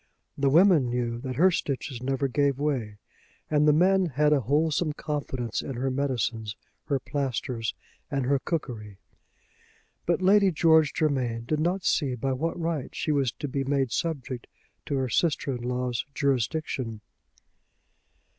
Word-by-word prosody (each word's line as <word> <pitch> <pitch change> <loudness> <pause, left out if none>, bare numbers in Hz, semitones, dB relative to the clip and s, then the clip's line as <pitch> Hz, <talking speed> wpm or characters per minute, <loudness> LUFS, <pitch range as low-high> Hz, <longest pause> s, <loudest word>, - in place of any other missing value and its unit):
The 140 0 +2
women 160 -4 +5
knew 120 -1 -1
that 130 +1 -5
her 185 +7 +5
stitches 135 -5 -3
never 135 +1 0
gave 140 0 +1
way, 130 -8 -2 0.5
and 150 0 +4
the - - +7
men 185 +4 +4
had 150 +1 +2
a 145 - +4
wholesome 150 - +1
confidence 135 -7 -3
in 135 - -5
her 130 +2 -1
medicines, 115 -5 -1 0.3
her 140 -2 0
plasters, 130 -4 -2 0.3
and 140 -4 -1
her 140 +1 +2
cookery. 110 - -4 1.1
But 175 +2 +1
Lady 200 +1 +5
George 160 -2 +4
Germain 125 -7 0
did 155 +5 0
not 175 +4 0
see 135 -5 +1
by 135 +3 -1
what 165 +6 -2
right 165 -5 -2
she 155 - -1
was 140 -5 +2
to 145 - -5
be 135 0 -2
made 135 -2 0
subject 135 -6 -3 0.4
to 145 - -1
her 130 -1 0
sister 140 0 +1
in 120 - -6
law's 125 -1 -2
jurisdiction. 135 -4 -1
140 Hz, 150 wpm, -27 LUFS, 125-155 Hz, 1.1 s, the